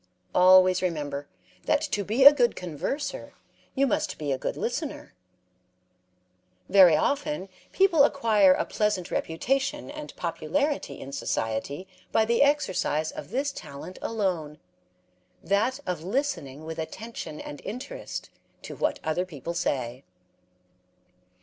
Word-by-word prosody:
Always 185 Hz, 0 st, +6 dB
remember 145 Hz, -5 st, -3 dB, 0.4 s
that -, -, +3 dB
to 250 Hz, -10 st, -1 dB
be 230 Hz, +7 st, +2 dB
a 285 Hz, -, +12 dB
good 245 Hz, -5 st, +2 dB
converser 225 Hz, -, -4 dB, 0.4 s
you 275 Hz, 0 st, +3 dB
must 255 Hz, -, -1 dB
be 145 Hz, -2 st, -3 dB
a 135 Hz, -, +1 dB
good -, -, -3 dB
listener. -, -, -4 dB, 1.5 s
Very 185 Hz, -5 st, +7 dB
often 280 Hz, -, -1 dB, 0.2 s
people 365 Hz, -7 st, +5 dB
acquire 220 Hz, -9 st, +4 dB
a -, -, -1 dB
pleasant 210 Hz, -4 st, -1 dB
reputation 270 Hz, -, -1 dB
and 300 Hz, 0 st, -8 dB
popularity 290 Hz, 0 st, -2 dB
in 135 Hz, -, -8 dB
society 140 Hz, +8 st, -3 dB, 0.2 s
by 220 Hz, -, +3 dB
the 235 Hz, +1 st, +2 dB
exercise 190 Hz, -, +1 dB
of -, -, -8 dB
this 275 Hz, +6 st, -1 dB
talent 140 Hz, -, -9 dB
alone 180 Hz, -9 st, -2 dB, 0.9 s
that 225 Hz, +7 st, +1 dB
of 175 Hz, -4 st, -3 dB
listening 180 Hz, -, -2 dB
with 160 Hz, 0 st, -6 dB
attention 165 Hz, -2 st, -6 dB
and 145 Hz, -, -8 dB
interest 380 Hz, -, -6 dB, 0.3 s
to -, -, -7 dB
what -, -, -1 dB
other 160 Hz, +3 st, 0 dB
people 170 Hz, -2 st, -6 dB
say. 130 Hz, -6 st, -2 dB
190 Hz, 125 wpm, -27 LUFS, -, 1.5 s, a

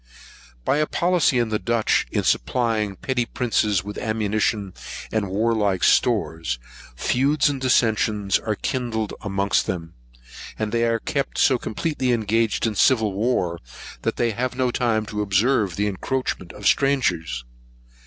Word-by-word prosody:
By 140 Hz, -, +2 dB
a 150 Hz, 0 st, +1 dB
policy 175 Hz, -6 st, +2 dB
in 120 Hz, -2 st, +1 dB
the 105 Hz, -1 st, 0 dB
Dutch, 115 Hz, -2 st, +1 dB
in -, -, 0 dB
supplying 115 Hz, -4 st, +1 dB
the 95 Hz, -, -10 dB
petty 125 Hz, +3 st, -1 dB
princes 105 Hz, -6 st, 0 dB
with 105 Hz, 0 st, -6 dB
ammunition 110 Hz, -3 st, -1 dB, 0.4 s
and 105 Hz, -3 st, -1 dB
warlike 105 Hz, -2 st, +1 dB
stores, 80 Hz, -7 st, +2 dB, 0.4 s
feuds 140 Hz, -, +2 dB
and 135 Hz, -2 st, -5 dB
dissentions 110 Hz, -5 st, +2 dB
are 110 Hz, -1 st, -2 dB
kindled 115 Hz, -3 st, -2 dB
amongst 100 Hz, -2 st, 0 dB
them; 85 Hz, -3 st, -4 dB, 0.6 s
and 110 Hz, -1 st, -2 dB
they 115 Hz, 0 st, +1 dB
are 115 Hz, 0 st, +2 dB
kept 140 Hz, +4 st, -3 dB
so 130 Hz, -3 st, +4 dB
completely 130 Hz, +1 st, -1 dB
engaged 110 Hz, 0 st, +1 dB
in 110 Hz, -, 0 dB
civil 110 Hz, -1 st, +3 dB
war, 95 Hz, -5 st, 0 dB, 0.4 s
that -, -, -1 dB
they 120 Hz, -1 st, +1 dB
have 125 Hz, +3 st, -2 dB
no 125 Hz, -1 st, +1 dB
time 115 Hz, -3 st, 0 dB
to 105 Hz, 0 st, -3 dB
observe 105 Hz, -1 st, +2 dB
the 105 Hz, -, 0 dB
encroachments 105 Hz, -2 st, -3 dB
of -, -, -9 dB
strangers. 85 Hz, -, +1 dB
110 Hz, 145 wpm, -23 LUFS, 100-125 Hz, 0.6 s, so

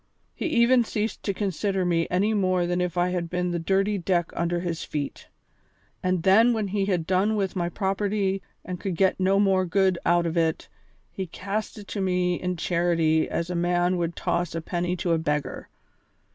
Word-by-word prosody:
He -, -, -3 dB
even 245 Hz, -4 st, +4 dB
ceased 220 Hz, 0 st, -3 dB
to 200 Hz, -, -1 dB
consider 195 Hz, -1 st, -1 dB
me 165 Hz, -1 st, +1 dB
any 200 Hz, +5 st, +1 dB
more 185 Hz, -3 st, +1 dB
than 175 Hz, +1 st, 0 dB
if 180 Hz, 0 st, -2 dB
I 175 Hz, +1 st, +2 dB
had 175 Hz, -2 st, -2 dB
been 180 Hz, 0 st, -1 dB
the 170 Hz, -, -1 dB
dirty 195 Hz, +4 st, +1 dB
deck 175 Hz, -1 st, 0 dB
under 170 Hz, 0 st, -1 dB
his 170 Hz, -2 st, -3 dB
feet. 145 Hz, -2 st, -5 dB, 0.7 s
And 185 Hz, -2 st, 0 dB
then, 220 Hz, +6 st, +5 dB
when 215 Hz, -3 st, -1 dB
he 200 Hz, 0 st, 0 dB
had 180 Hz, -5 st, 0 dB
done 190 Hz, +5 st, +2 dB
with 195 Hz, -2 st, -1 dB
my 175 Hz, -2 st, -1 dB
property 195 Hz, 0 st, -1 dB, 0.2 s
and 180 Hz, -1 st, -5 dB
could 190 Hz, -1 st, -3 dB
get 190 Hz, +2 st, +2 dB
no 190 Hz, +1 st, +3 dB
more 190 Hz, -2 st, +3 dB
good 185 Hz, 0 st, +2 dB
out 175 Hz, 0 st, +3 dB
of 165 Hz, 0 st, -2 dB
it, 160 Hz, -1 st, 0 dB, 0.4 s
he 190 Hz, -1 st, -5 dB
cast 200 Hz, +6 st, -4 dB
it 205 Hz, -2 st, -10 dB
to 200 Hz, -, -3 dB
me 180 Hz, -1 st, 0 dB
in 180 Hz, -1 st, -2 dB
charity 165 Hz, -2 st, +1 dB
as 170 Hz, +1 st, -2 dB
a -, -, -2 dB
man 175 Hz, +1 st, +1 dB
would 170 Hz, -1 st, -2 dB
toss 175 Hz, -1 st, -1 dB
a 165 Hz, -, -2 dB
penny 175 Hz, +2 st, -2 dB
to 175 Hz, -1 st, -2 dB
a 165 Hz, -, +2 dB
beggar. 150 Hz, -3 st, -3 dB
180 Hz, 200 wpm, -25 LUFS, 175-195 Hz, 0.7 s, then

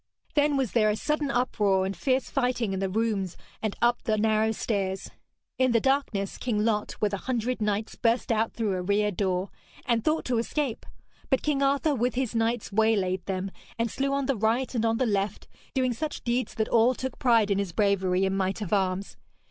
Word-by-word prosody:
Then 290 Hz, -1 st, +3 dB
was 260 Hz, -5 st, 0 dB
there 215 Hz, -3 st, +3 dB
a 210 Hz, -, +1 dB
sudden 300 Hz, +4 st, -1 dB
uproar 210 Hz, -7 st, +1 dB
and 195 Hz, +1 st, -3 dB
fierce 260 Hz, -1 st, 0 dB
fighting 245 Hz, -6 st, 0 dB
in 190 Hz, -, -2 dB
the 195 Hz, 0 st, -1 dB
rooms 200 Hz, -3 st, -1 dB, 0.2 s
and 215 Hz, -2 st, -2 dB
up 240 Hz, 0 st, +3 dB
the 215 Hz, -1 st, 0 dB
narrow 220 Hz, +1 st, +2 dB
stairs. 195 Hz, -3 st, -2 dB, 0.5 s
In 255 Hz, -2 st, +3 dB
the 230 Hz, -, +5 dB
darkness 255 Hz, -7 st, 0 dB
King 215 Hz, -4 st, 0 dB
Lot, 210 Hz, -2 st, -1 dB
with 210 Hz, -1 st, 0 dB
a -, -, 0 dB
hundred 245 Hz, -1 st, -1 dB
knights, 210 Hz, +1 st, -1 dB
burst 235 Hz, 0 st, +1 dB
out 225 Hz, 0 st, +1 dB
through 220 Hz, -4 st, -1 dB
a 185 Hz, -, -2 dB
rear 205 Hz, +3 st, +1 dB
door, 185 Hz, 0 st, -1 dB, 0.3 s
and 235 Hz, -2 st, +1 dB
thought 315 Hz, +1 st, +1 dB
to 245 Hz, -2 st, +1 dB
escape; 260 Hz, 0 st, -2 dB, 0.4 s
but 265 Hz, -3 st, +2 dB
King 290 Hz, -2 st, +1 dB
Arthur 280 Hz, +2 st, +2 dB
with 245 Hz, -1 st, 0 dB
his 255 Hz, -2 st, -1 dB
knights 230 Hz, 0 st, 0 dB
waylaid 195 Hz, -4 st, +2 dB
them, 190 Hz, 0 st, -2 dB, 0.3 s
and 230 Hz, -1 st, 0 dB
slew 275 Hz, +1 st, -1 dB
on 280 Hz, 0 st, 0 dB
the 275 Hz, 0 st, +1 dB
right 230 Hz, +5 st, 0 dB
and 230 Hz, -2 st, 0 dB
on 225 Hz, 0 st, +1 dB
the 255 Hz, -, +1 dB
left, 200 Hz, -2 st, -1 dB, 0.3 s
doing 255 Hz, -2 st, +2 dB
such 300 Hz, +7 st, -4 dB
deeds 245 Hz, +1 st, -1 dB
that 220 Hz, -, 0 dB
all 235 Hz, +2 st, +4 dB
took 260 Hz, 0 st, -5 dB
pride 230 Hz, -5 st, +3 dB
in 200 Hz, -, +2 dB
his 200 Hz, -3 st, -2 dB
bravery 190 Hz, -1 st, +2 dB
and 190 Hz, 0 st, 0 dB
might 190 Hz, +1 st, -1 dB
of 210 Hz, -2 st, -3 dB
arms. 190 Hz, -1 st, 0 dB
225 Hz, 205 wpm, -27 LUFS, 200-250 Hz, 0.5 s, the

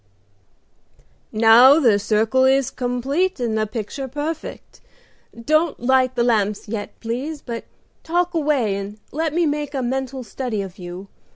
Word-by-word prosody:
"Now 230 Hz, +6 st, +7 dB
the 230 Hz, -9 st, +4 dB
circle 220 Hz, +5 st, +2 dB
is 265 Hz, -1 st, +3 dB
complete 265 Hz, +9 st, -1 dB
and 235 Hz, -3 st, -1 dB
the 215 Hz, 0 st, 0 dB
picture 225 Hz, +5 st, -5 dB
perfect. 295 Hz, +4 st, -6 dB, 0.6 s
Don't 310 Hz, +6 st, +1 dB
light 255 Hz, +1 st, +2 dB
the 240 Hz, -, +2 dB
lamps 210 Hz, -4 st, 0 dB
yet, 210 Hz, -1 st, -6 dB
please, 260 Hz, +7 st, -4 dB
but 230 Hz, -2 st, -6 dB, 0.4 s
talk 350 Hz, +2 st, 0 dB
away 290 Hz, -10 st, +1 dB
and 200 Hz, +1 st, -6 dB
let 320 Hz, +1 st, -1 dB
me 340 Hz, +2 st, +1 dB
make 295 Hz, -1 st, -2 dB
a 265 Hz, -, -1 dB
mental 265 Hz, +1 st, -3 dB
study 230 Hz, -3 st, -4 dB
of 190 Hz, 0 st, -10 dB
you. 180 Hz, +2 st, -8 dB
255 Hz, 145 wpm, -21 LUFS, 220-290 Hz, 0.6 s, Now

